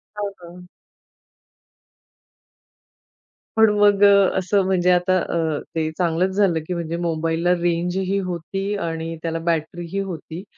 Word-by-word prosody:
हां, 205 -1 -3
हां. 180 +1 -12 2.9
पण 220 0 +6
मग 205 -1 +4
अ, 200 -2 +5
असं 195 +2 +1
म्हणजे 180 -1 +2
आता 180 +1 +3
अ, 160 -3 -1 0.2
ते 160 -1 0
चांगलच 175 +1 +1
झालं, 190 -5 +2
की 180 - -2
म्हणजे 170 -1 -3
मोबाईलला 165 +1 0
रेंज 175 +1 0
ही 190 +1 0
होती 195 +2 -4
आणि 165 0 -4
त्याला 165 0 -2
बॅटरी 165 +1 -2
ही 195 - -2
होती. 180 -2 -6
175 Hz, 130 wpm, -22 LUFS, 165-195 Hz, 2.9 s, पण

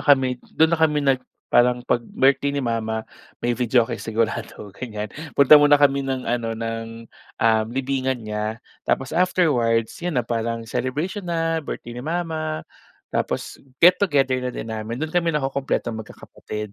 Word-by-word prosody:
kami 130 -4 +3
do'n 160 0 +3
na 170 - +2
kami 150 -2 +3
nag 135 -2 +3 0.3
parang 125 0 +4
'pag 120 - +1
birthday 140 +1 +2
ni 135 - -1
mama 110 -1 -2 0.4
may 120 - +2
videoke 120 -2 +1
sigurado, 110 -2 -3
ganyan. 105 -4 -5 0.2
Punta 145 +2 +8
muna 145 0 +6
kami 140 -1 +3
ng 135 -1 -3
ano 115 -1 -1
ng 115 0 -5 0.3
um, 110 -1 +3
libingan 130 -1 -2
niya, 105 +1 -3 0.3
tapos 135 +2 0
afterwards, 130 -11 +2
'yan 175 -4 -2
na, 125 - +1
parang 115 0 -2
celebration 165 - -3
na, 165 -1 0
birthday 120 -5 -7
ni 120 - -6
mama. 155 0 -3 0.5
Tapos, - - -2 0.2
get-together 145 -8 +4
na 125 - -2
din 115 -2 -5
namin, 110 +2 -4
do'n 155 +3 -4
kami 175 -1 +2
nakukumpletong 135 -5 -2
mag-kakapatid. 105 -1 -8
130 Hz, 150 wpm, -23 LUFS, 115-145 Hz, 0.5 s, Punta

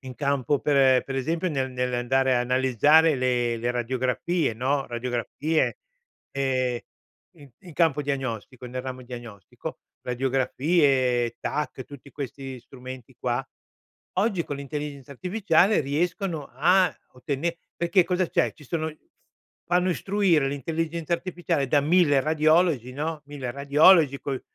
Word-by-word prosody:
in 130 -2 -9
campo, 140 -1 0
per 135 -3 +4
per 135 - -5
esempio, 165 +7 -1
ne 135 -3 -1
nell'andare 125 +1 +1
a - - +2
analizzare 130 +5 +4
le 120 -2 +1
le 120 +2 -1
radiografie, 125 +4 -1
no, 135 +4 0
radiografie, 125 - -1 0.5
ehm, 130 -3 0 0.6
in 145 -3 -15
in 180 -4 -12
campo 155 -4 +2
diagnostico, 130 -3 -4
nel 125 +1 -5
ramo 130 -1 -6
diagnostico, 120 -6 -9 0.2
radiografie, 130 -1 +1
TAC, 150 -3 -3
tutti 140 0 -13
questi 135 -1 -6
strumenti 130 0 -11
qua, - - -2 0.7
oggi 195 -5 +1
con 145 - -4
l'intelligenza 140 0 -6
artificiale 185 - +2
riescono 165 +2 -2
a 180 +8 +3 0.2
ottene 140 +6 -3 0.2
perché 170 +1 +3
cosa 180 0 0
c'è? - - +1
Ci 150 - -16
sono 160 +2 -2 0.8
fanno 180 +1 +3
istruire 185 -7 +2
l'intelligenza 165 +4 -2
artificiale 170 -5 -1
da 145 - +4
1000 150 -3 +4
radiologi, 155 -3 +2
no, 155 +2 -3
1000 140 -4 -5
radiologi 140 +2 +5
poi 135 -2 -3
140 Hz, 125 wpm, -25 LUFS, 130-160 Hz, 0.8 s, radiologi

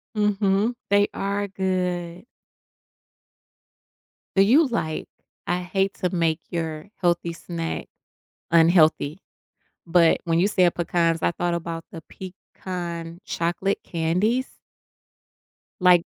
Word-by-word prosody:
Mhm, 210 +2 +1
they 205 0 +4
are 200 +1 -2
good. 180 -2 -2 2.1
Do 195 - +6
you 275 +9 +5
like 155 -10 -3 0.4
I 180 0 0
hate 195 +2 -1
to 180 - -1
make 165 -1 +1
your 160 0 -4
healthy 170 -1 +1
snack 165 0 -5 0.6
unhealthy, 165 -1 +4 0.7
but 170 -1 +4
when 165 -1 +2
you 190 - +4
said 185 -4 +3
pecans, 165 -1 +1
I - - +2
thought 175 0 -1
about 165 -1 -4
the 165 - -8
pecan 175 -2 -7
chocolate 180 +3 -1
candies? 185 +10 -1 1.2
Like 180 -2 +6
175 Hz, 105 wpm, -24 LUFS, 165-195 Hz, 2.1 s, Do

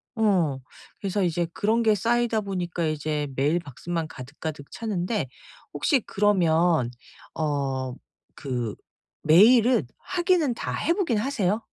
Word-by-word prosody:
어. 180 -11 +2 0.4
그래서 195 0 -1
이제 170 -1 0
그런게 220 0 +2
쌓이다 230 +1 +1
보니까 180 -4 -3
이제 150 -1 -1
메일 150 +6 +2
박스만 165 +2 -4
가득가득 145 +2 -7
차는데. 195 - -2 0.5
혹시 275 -7 +2
그러면 170 - +2 0.4
어 135 -4 -2 0.4
그 120 -6 -4 0.5
메일은 225 - +6
확인은 345 -7 +1
다 - - -4
해 335 - +1
보긴 335 - 0
하세요? 215 -4 0
175 Hz, 250 characters per minute, -25 LUFS, 150-225 Hz, 0.5 s, 메일은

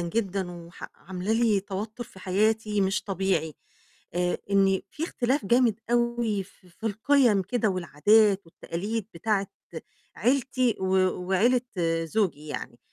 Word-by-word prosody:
جدًا، 190 +1 -2
وح 170 0 -10
عاملة 190 +3 -4
لي 225 -3 +3
توتر 210 +4 -5
في 210 - -16
حياتي 210 +3 +1
مش 195 +1 +1
طبيعي، 190 -5 -1 0.6
آآ، 180 0 0
إني 195 -1 +3
في 315 - -3
اختلاف 260 - -1
جامد 235 -1 +3
أوي 235 -3 +1
ف - - -20 0.3
في 225 - -3
القِيَم 225 -1 +3
كده، 220 +3 0
والعادات 195 +4 +3
والتقاليد 200 +6 -4
بتاعة 200 +3 0 0.7
عيلتي، 255 -2 +1
و - - -1 0.4
وعيلة 235 +7 +3 0.4
زوجي 165 -4 -1
يعني، 120 -4 -6
205 Hz, 125 wpm, -27 LUFS, 185-230 Hz, 0.7 s, لي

